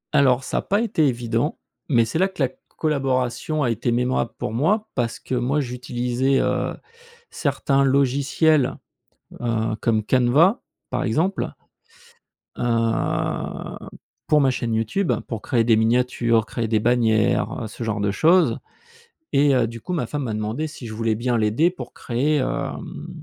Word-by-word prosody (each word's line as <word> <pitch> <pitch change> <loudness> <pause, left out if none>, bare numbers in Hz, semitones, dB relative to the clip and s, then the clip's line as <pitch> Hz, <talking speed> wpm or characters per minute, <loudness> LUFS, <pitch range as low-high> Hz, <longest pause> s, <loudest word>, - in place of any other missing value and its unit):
Alors 135 -3 +4
ça - - -3
a - - +1
pas 205 +2 0
été 165 -10 +2
évident, 120 +2 -1 0.3
mais 120 -5 +4
c'est 135 +8 -2
là 190 - +4
que 190 -7 -3
la 130 - +2
c 130 - -24 0.2
collaboration 135 0 0
a 125 - +1
été 120 +2 -1
mémorable 125 -1 0
pour - - -3
moi 205 - +1
parce 120 -3 -1
que 130 - -4
moi 130 +5 +1
j'utilisais, 125 +1 -1
heu, 125 0 0 0.6
certains 140 -1 0
logiciels, 140 +2 +2 0.6
heu, 115 -2 0
comme 110 -2 +1
Canva, 130 - +3 0.3
par 125 - -1
exemple 165 - -1 1.0
heu, 115 -1 -1 0.5
pour 150 -1 +4
ma 135 - +4
chaîne 120 -2 -2
YouTube, 115 - 0 0.2
pour 115 -3 -5
créer 120 -2 +1
des 115 -1 +4
miniatures, 115 0 +2
créer 115 -1 -3
des 110 0 +2
bannières, 110 -2 +2
heu, - - -4
ce 115 - -7
genre 110 -1 -2
de 100 -1 +1
choses 170 - +3 0.7
et 140 0 +4
heu, 120 -2 +2
du 115 0 -8
coup, 180 - -5
ma 160 -8 -1
femme 145 +3 -3
m'a 115 -4 -3
demandé 110 +8 -2
si 140 -5 -9
je 110 - -7
voulais 110 0 0
bien 120 +2 0
l'aider 110 +10 +2
pour 180 - -9
créer, 140 +6 0
hem, 130 - -4
125 Hz, 165 wpm, -22 LUFS, 115-145 Hz, 1.0 s, Alors